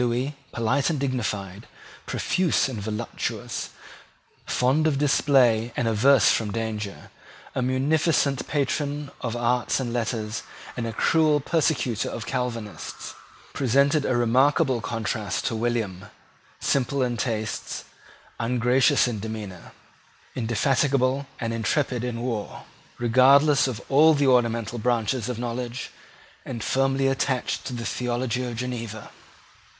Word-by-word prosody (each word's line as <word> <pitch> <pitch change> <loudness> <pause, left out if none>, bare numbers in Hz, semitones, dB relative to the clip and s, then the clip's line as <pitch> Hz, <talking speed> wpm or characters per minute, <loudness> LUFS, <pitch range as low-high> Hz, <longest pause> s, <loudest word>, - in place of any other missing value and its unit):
Lewis, 125 +4 -1 0.2
polite 115 +6 +1
and 155 -4 -1
dignified, 110 -7 -3 0.4
profuse 180 -6 +1
and 120 -6 -5
voluptuous, 110 +2 -4 0.8
fond 140 +5 +2
of 145 -3 +1
display 130 -5 +3
and 120 - +1
averse 115 +2 +5
from 110 -2 0
danger, 105 -2 -4 0.4
a - - -1
munificent 140 +2 +1
patron 145 0 -1
of 115 -1 -3
arts 120 +2 +1
and 120 -3 -3
letters, 115 -2 -2 0.3
and 120 -2 -3
a - - -3
cruel 155 +6 +3
persecutor 140 -7 0
of 115 - -5
Calvinists, 120 -5 -4 0.4
presented 140 +3 +2
a 130 - 0
remarkable 130 +2 +3
contrast 110 -3 -3
to 115 - -1
William, 110 -5 -2 0.5
simple 140 0 +1
in 120 -1 -1
tastes, 110 -1 -3 0.6
ungracious 125 +2 +3
in 115 -4 -3
demeanour, 105 -4 -7 0.6
indefatigable 130 +3 +1
and 115 -2 -2
intrepid 125 +2 0
in 120 -1 -3
war, 115 -5 -4 0.3
regardless 135 +5 +5
of 125 -5 -4
all 155 +3 +6
the 145 0 +2
ornamental 115 -2 +2
branches 120 0 0
of 125 - -3
knowledge, 120 +1 -4 0.5
and 115 -4 -5
firmly 135 0 +1
attached 135 -1 0
to - - -5
the 120 -1 -5
theology 125 0 -1
of 120 -2 -4
Geneva. 115 -3 -5
125 Hz, 120 wpm, -25 LUFS, 115-135 Hz, 0.8 s, all